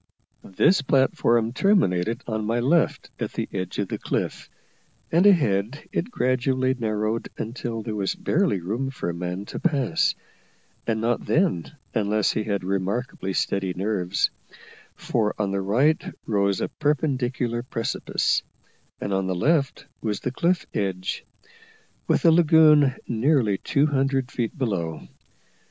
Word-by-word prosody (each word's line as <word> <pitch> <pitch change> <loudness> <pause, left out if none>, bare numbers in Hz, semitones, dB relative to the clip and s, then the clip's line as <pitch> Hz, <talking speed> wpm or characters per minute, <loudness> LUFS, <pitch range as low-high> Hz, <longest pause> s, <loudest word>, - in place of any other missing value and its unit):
This 185 - +4
platform 120 -4 +2
terminated 115 - +2
on 110 -2 -2
my 115 +2 +1
left 150 +8 +1
at - - -3
the - - -3
edge 95 -2 -4
of 100 - -1
the - - -3
cliff, - - -3 0.6
and 175 +5 +5
ahead 135 - +2
it 185 - -2
gradually 130 - +1
narrowed 110 -2 -2
until 115 -1 -4
there 110 - -4
was 100 -2 -1
barely 165 - +1
room 115 +10 -2
for 125 -9 -3
a - - -7
man 90 +3 -4
to - - -6
pass, 140 - +1 0.7
and 110 -1 0
not 120 +1 -1
then 155 - +1 0.2
unless 105 -1 +1
he - - -1
had 100 -3 -2
remarkably 95 +3 -2
steady 95 -1 -1
nerves: 95 -1 0 0.6
for 105 -3 -1
on 100 -2 0
the 100 0 -1
right 130 +11 +2 0.2
rose 100 -3 +1
a - - 0
perpendicular 130 -5 -1
precipice, 115 -2 -1 0.6
and 100 - -3
on 95 -1 0
the 95 - -1
left 140 - +1 0.2
was 105 -3 -2
the 125 - -2
cliff 170 +6 +1
edge, 95 -2 -2 0.8
with - - +2
the 165 - +7
lagoon 155 -4 +6
nearly 115 -4 +2
two 140 +1 +2
hundred 135 -2 0
feet 120 +2 -3
below. 95 - -2
115 Hz, 140 wpm, -24 LUFS, 100-140 Hz, 0.8 s, the